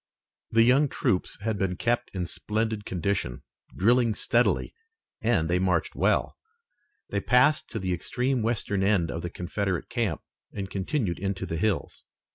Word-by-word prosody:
The 115 Hz, 0 st, +5 dB
young 135 Hz, +5 st, +5 dB
troops 90 Hz, -, -1 dB
had 110 Hz, -1 st, -1 dB
been 95 Hz, -2 st, 0 dB
kept 120 Hz, +5 st, 0 dB
in 90 Hz, -2 st, -1 dB
splendid 110 Hz, +3 st, -2 dB
condition, 90 Hz, -8 st, -2 dB, 0.3 s
drilling 115 Hz, +2 st, +3 dB
steadily, 120 Hz, +3 st, +1 dB, 0.5 s
and 110 Hz, -9 st, +2 dB
they 90 Hz, +2 st, +2 dB
marched 90 Hz, -2 st, +1 dB
well. -, -, +1 dB, 0.7 s
They -, -, 0 dB
passed 130 Hz, +4 st, +3 dB
to 115 Hz, -, -4 dB
the 95 Hz, -3 st, -1 dB
extreme 125 Hz, +8 st, -1 dB
western 110 Hz, -3 st, -1 dB
end 95 Hz, -4 st, +2 dB
of 85 Hz, -, -4 dB
the 85 Hz, -, -4 dB
Confederate 90 Hz, +1 st, -3 dB
camp, 115 Hz, -9 st, -1 dB, 0.3 s
and 95 Hz, -2 st, -5 dB
continued 95 Hz, -, -1 dB
into 95 Hz, 0 st, -2 dB
the 80 Hz, -, -3 dB
hills. 105 Hz, +2 st, -1 dB
100 Hz, 150 wpm, -27 LUFS, 90-115 Hz, 0.7 s, The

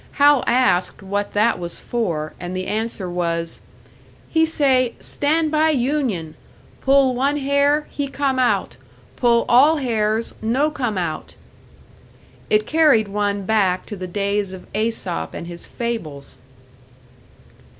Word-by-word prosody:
Hal 290 Hz, -1 st, +5 dB
asked 190 Hz, -7 st, +2 dB
what 200 Hz, +1 st, -3 dB
that 215 Hz, 0 st, +2 dB
was 170 Hz, -1 st, -5 dB
for; 170 Hz, -11 st, -2 dB
and 180 Hz, +1 st, -5 dB
the 185 Hz, -, -3 dB
answer 215 Hz, -1 st, -3 dB
was, 170 Hz, -1 st, -3 dB, 0.7 s
"He 320 Hz, 0 st, +3 dB
say, 265 Hz, -6 st, +2 dB
'Stand 310 Hz, +2 st, 0 dB
by 310 Hz, +1 st, +3 dB
union! 250 Hz, -, -1 dB, 0.5 s
Pull 270 Hz, -1 st, +4 dB
one 275 Hz, +4 st, 0 dB
hair, 285 Hz, +2 st, +2 dB
he 285 Hz, -1 st, -3 dB
come 275 Hz, -1 st, -1 dB
out; 250 Hz, -, +1 dB, 0.4 s
pull 235 Hz, -2 st, +3 dB
all 285 Hz, +6 st, +5 dB
hairs, 225 Hz, -4 st, -1 dB
no 260 Hz, +8 st, +1 dB
come 245 Hz, -9 st, -2 dB
out'!" 165 Hz, -4 st, -4 dB, 1.1 s
It 215 Hz, 0 st, +3 dB
carried 290 Hz, -9 st, +3 dB
one 205 Hz, 0 st, -1 dB
back 190 Hz, -4 st, +1 dB
to 210 Hz, -, -7 dB
the 185 Hz, -1 st, -6 dB
days 200 Hz, +1 st, -1 dB
of 185 Hz, -, -10 dB
Aesop 215 Hz, -, -2 dB
and -, -, -6 dB
his 170 Hz, 0 st, -5 dB
fables! 190 Hz, -, -5 dB
225 Hz, 130 wpm, -21 LUFS, 185-275 Hz, 1.1 s, Hal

